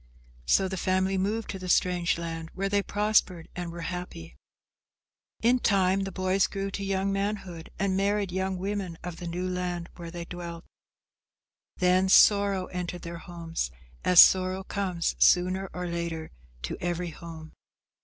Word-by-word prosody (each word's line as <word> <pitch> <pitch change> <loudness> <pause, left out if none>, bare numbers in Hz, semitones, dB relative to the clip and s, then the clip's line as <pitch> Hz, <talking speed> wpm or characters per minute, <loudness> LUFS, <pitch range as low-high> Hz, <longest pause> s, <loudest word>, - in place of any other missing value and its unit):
So 190 - +4
the 190 0 -4
family 190 +1 +1
moved 205 +4 -1
to 195 - -6
the 185 0 -6
strange 180 -1 +2
land 165 -1 -5
where 195 +1 -1
they 200 0 +2
prospered 205 -5 +1
and 175 -1 -4
were 170 0 -7
happy. 165 - -6 1.1
In 245 +2 +4
time 195 -3 +2
the 195 - -5
boys 185 +1 +1
grew 195 0 -4
to 200 - -4
young 195 0 0
manhood 195 -4 -3
and 195 -1 0
married 200 0 +1
young 190 +1 -1
women 190 -2 -3
of 175 -2 -6
the 175 - -6
new 180 +2 -3
land 180 -1 -3
where 170 -1 -7
they 170 0 -6
dwelt. 170 -1 -7 1.1
Then 185 +1 +3
sorrow 200 -1 +5
entered 180 -1 -5
their 170 0 -6
homes, 165 - -4 0.3
as 180 -1 +6
sorrow 185 0 +6
comes 185 -4 -2
sooner 185 +2 +3
or 180 0 -5
later 170 -2 -4 0.3
to 65 - -4
every 175 0 -2
home. 160 0 -10
185 Hz, 155 wpm, -28 LUFS, 170-195 Hz, 1.1 s, as